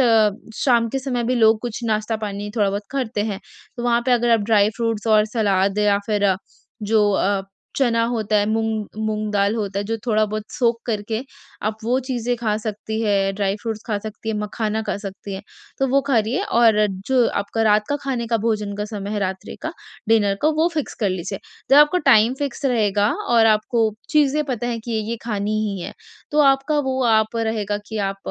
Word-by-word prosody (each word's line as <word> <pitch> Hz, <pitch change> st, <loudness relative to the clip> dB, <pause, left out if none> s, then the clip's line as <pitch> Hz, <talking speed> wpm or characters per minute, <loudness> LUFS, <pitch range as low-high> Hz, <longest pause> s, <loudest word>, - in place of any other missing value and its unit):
अ, 225 Hz, -4 st, +5 dB, 0.3 s
शाम 235 Hz, -3 st, +2 dB
के 270 Hz, +4 st, -2 dB
समय 255 Hz, -3 st, -2 dB
भी 250 Hz, +2 st, +1 dB
लोग 220 Hz, -2 st, +4 dB
कुछ 240 Hz, -1 st, -4 dB
नाश्ता 215 Hz, 0 st, 0 dB
पानी 205 Hz, 0 st, -5 dB
थोड़ा-बहुत 200 Hz, -1 st, +1 dB
करते 250 Hz, -6 st, -2 dB
हैं। 195 Hz, -1 st, -5 dB, 0.4 s
तो 240 Hz, -, -5 dB
वहाँ 235 Hz, -1 st, +2 dB
पे 250 Hz, -, +3 dB
अगर 240 Hz, 0 st, +2 dB
आप 225 Hz, -, +4 dB
ड्राई 210 Hz, -1 st, +5 dB
फ्रूट्स 230 Hz, -2 st, -2 dB
और 215 Hz, -1 st, +5 dB
सलाद 200 Hz, -2 st, +1 dB
या 205 Hz, -1 st, +3 dB
फिर 205 Hz, -3 st, +2 dB, 0.5 s
जो 210 Hz, -1 st, +3 dB
अ, 195 Hz, 0 st, +1 dB, 0.3 s
चना 235 Hz, -4 st, +2 dB
होता 215 Hz, -2 st, 0 dB
है 205 Hz, 0 st, +2 dB
मूँग 220 Hz, -1 st, -1 dB, 0.2 s
मूँग 215 Hz, 0 st, -2 dB
दाल 200 Hz, +1 st, +2 dB
होता 200 Hz, -3 st, -2 dB
है, 200 Hz, -, -2 dB
जो 225 Hz, +2 st, -2 dB
थोड़ा-बहुत 215 Hz, -1 st, +1 dB
सोक 240 Hz, -5 st, +1 dB
करके 220 Hz, 0 st, -2 dB, 0.4 s
आप 215 Hz, +1 st, -1 dB
वो 250 Hz, +3 st, +2 dB
चीज़ें 245 Hz, -1 st, -1 dB
खा 215 Hz, -3 st, -1 dB
सकती 220 Hz, 0 st, -4 dB
हैं, 195 Hz, -2 st, +1 dB
ड्राई 200 Hz, 0 st, 0 dB
फ्रूट्स 225 Hz, -2 st, -4 dB
खा 210 Hz, -3 st, -1 dB
सकती 215 Hz, +1 st, -8 dB
हैं, 220 Hz, -, -1 dB
मखाना 210 Hz, +1 st, -2 dB
खा -, -, -2 dB
सकती 195 Hz, -1 st, -7 dB
हैं। 190 Hz, -, -7 dB, 0.4 s
तो 270 Hz, -, +2 dB
वो 275 Hz, +2 st, +3 dB
खा 250 Hz, -, +4 dB
रही 220 Hz, +2 st, -1 dB
है -, -, 0 dB
और 225 Hz, -, +4 dB, 0.2 s
जो 255 Hz, -3 st, +4 dB
आपका 225 Hz, +3 st, -2 dB
रात 210 Hz, -1 st, +4 dB
का 290 Hz, -, 0 dB
खाने 250 Hz, -4 st, -2 dB
का 230 Hz, 0 st, +1 dB
भोजन 210 Hz, -3 st, -1 dB
का 210 Hz, -, -2 dB
समय 205 Hz, -2 st, -6 dB
है, 215 Hz, -, -1 dB
रात्रि 190 Hz, -1 st, -4 dB
का, -, -, -3 dB, 0.4 s
डिनर 205 Hz, -3 st, +3 dB
का 305 Hz, -, +4 dB
वो 325 Hz, +2 st, +3 dB
फिक्स 305 Hz, -, -3 dB
कर 205 Hz, -4 st, +2 dB
लीजिए। 185 Hz, +2 st, -4 dB, 0.3 s
जब 275 Hz, -, +7 dB
आपका 295 Hz, +5 st, +6 dB
टाइम 225 Hz, +4 st, +6 dB
फिक्स 285 Hz, 0 st, -4 dB
रहेगा 210 Hz, -5 st, +2 dB, 0.2 s
और 230 Hz, -2 st, +5 dB
आपको 220 Hz, +1 st, +2 dB, 0.2 s
चीज़ें 300 Hz, 0 st, +3 dB
पता 245 Hz, -4 st, -3 dB
है 235 Hz, -1 st, -2 dB
कि 235 Hz, -, -4 dB, 0.2 s
ये 235 Hz, -, -2 dB
खानी 210 Hz, -1 st, -1 dB
ही 195 Hz, -2 st, -4 dB
है, -, -, -6 dB, 0.4 s
तो 300 Hz, -, 0 dB
आपका 275 Hz, +2 st, +3 dB
वो 260 Hz, 0 st, 0 dB
आप 220 Hz, 0 st, +2 dB
रहेगा 215 Hz, -2 st, -1 dB
कि 220 Hz, -1 st, -4 dB
आप 195 Hz, -, -5 dB
220 Hz, 210 wpm, -21 LUFS, 205-240 Hz, 0.5 s, जब